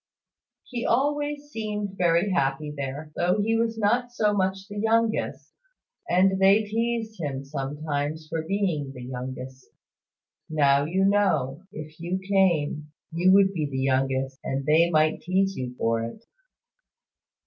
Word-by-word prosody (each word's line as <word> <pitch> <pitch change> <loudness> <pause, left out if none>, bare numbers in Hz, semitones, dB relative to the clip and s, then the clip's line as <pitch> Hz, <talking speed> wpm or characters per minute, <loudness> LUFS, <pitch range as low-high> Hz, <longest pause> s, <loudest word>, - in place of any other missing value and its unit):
"He 240 -2 -5
always 290 +3 0
seemed 210 -4 -4
very 175 +2 +2
happy 150 -3 0
there, 140 +2 -5
though 180 +4 +1
he 225 +2 +1
was 225 0 0 0.4
so 210 -2 +2
much 190 0 -1
the 205 0 -6
youngest. 225 +1 0 0.6
And 190 +2 +3
they 195 +3 +5
teased 225 -1 -2
him 140 -3 -3
sometimes 145 +2 -3
for 160 +1 -2
being 160 -6 -1
the 125 - -9
youngest. 130 +1 -7 0.8
Now 140 -2 +3
you 185 +5 +1
know, 195 -6 +1
if 155 +1 -9
you 175 +2 -2
came, 175 -6 +1 0.2
you 175 +3 +3
would 195 0 +5
be 155 -5 -1
the 135 - -4
youngest, 135 0 0
and 135 0 -2
they 160 +3 +4
might 155 -1 +2
tease 195 +2 +1
you 125 -1 -5
for 115 0 +1
it." 165 - -8
170 Hz, 135 wpm, -26 LUFS, 140-205 Hz, 0.8 s, they